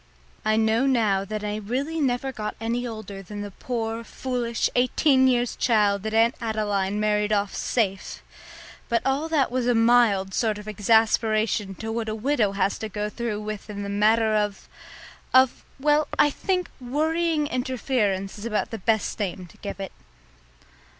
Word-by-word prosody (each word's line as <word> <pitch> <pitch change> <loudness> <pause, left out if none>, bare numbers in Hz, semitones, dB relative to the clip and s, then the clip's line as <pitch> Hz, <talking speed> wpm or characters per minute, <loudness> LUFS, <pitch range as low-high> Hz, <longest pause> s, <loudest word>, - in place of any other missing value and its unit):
I 215 0 +2
know 220 +4 +2
now 215 -7 +2
that 215 +1 -4
I 210 0 -2
really 265 +10 -2
never 265 0 0
got 210 -4 -5
any 235 +2 -2
older 215 -4 -7
than 205 +2 -7
the 205 - -7
poor, 230 +1 -3
foolish, 240 -1 -2
eighteen 260 +2 +3
years 245 -2 +1
child 210 -4 +2
that 220 +2 -4
Aunt 230 +2 +4
Adeline 205 -3 -1
married 210 0 +1
off 205 -1 +1
"safe." 195 -5 -2 0.7
But 230 -1 +1
all 275 +4 0
that 290 -6 +2
was 250 -1 0
a 245 - +3
mild 225 -5 +4
sort 220 -1 0
of 210 0 -10
exasperation 215 -1 +2
to 225 +3 -5
what 225 -1 -2
a 215 - -2
widow 225 -3 +1
has 195 0 0
to 220 - -4
go 210 +1 -3
through 220 -2 -3
with 215 0 -6
in 205 -1 -5
the 200 - -5
matter 215 +2 +3
of 210 -2 -1 0.7
of, 260 -1 +4 0.2
well, 295 +2 +3
I 295 - +5
think 365 +3 -2
worrying 310 +4 0
interference 245 -7 -1
is 210 - -7
about 215 -2 -1
the 225 - -5
best 220 +3 0
name 185 -2 -3
to 175 - -18
give 200 -1 -7
it. 195 -1 -5
220 Hz, 170 wpm, -25 LUFS, 210-250 Hz, 0.7 s, I